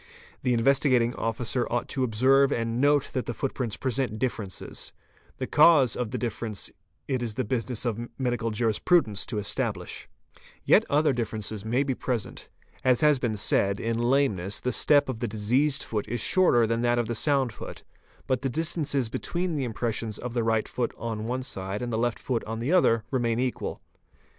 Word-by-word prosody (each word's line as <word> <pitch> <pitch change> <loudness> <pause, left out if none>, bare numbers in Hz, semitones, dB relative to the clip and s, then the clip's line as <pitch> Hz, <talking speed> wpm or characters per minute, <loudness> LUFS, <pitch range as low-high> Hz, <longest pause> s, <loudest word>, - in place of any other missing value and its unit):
'The 125 - 0
Investigating 125 -1 +3
Officer 120 +2 -1
ought 120 0 -1
to 130 - -2
observe 130 +4 +4
and 115 0 -1
note 145 0 +3
that 130 - -2
the 120 - -3
footprints 130 -5 -3
present 130 -4 -1
differences. 110 -6 -4 0.5
The - - -3
cause 150 -5 +5
of 125 -3 -2
the 125 - -3
difference 110 -3 -3 0.4
it 130 -3 -1
is 115 -3 -3
the 130 - -1
business 120 +1 -2
of 120 0 -2
medical 120 -3 -1
jurisprudents 110 - +1
to 110 - -3
establish. 105 0 -2 0.6
Yet - - +5
other 150 0 +3
differences 110 -3 -3
may 120 +5 +1
be 135 -2 -1
present.. 120 -4 -4 0.3
As 125 -2 +3
has 150 -3 +4
been 115 -4 -1
said, 100 0 +2
in 115 0 -1
lameness, 120 -7 +1
the 125 - -1
step 145 +4 +4
of 130 -4 -4
the 120 - -2
diseased 125 +7 +1
foot 105 -2 -3
is 120 +2 -3
shorter 175 -11 +4
than 115 +1 0
that 120 0 +2
of 120 - +1
the 115 - -3
sound 135 -1 +1
foot, - - -9 0.4
but 130 -2 0
the 135 - -1
distances 150 -3 -1
between 175 +8 -2
the 140 -3 -1
impressions 115 -2 -3
of 125 -1 -6
the 120 -2 0
right 110 -1 +1
foot 120 -2 -2
on 110 -1 -4
one 130 +2 -2
side 95 -1 -4
and 120 -1 -3
the - - 0
left 120 0 0
foot 120 -3 -2
on 110 +1 -4
the 120 +9 -1
other 115 -11 +4
remain 120 -3 0
equal. 125 -1 -3
120 Hz, 185 wpm, -27 LUFS, 110-130 Hz, 0.6 s, cause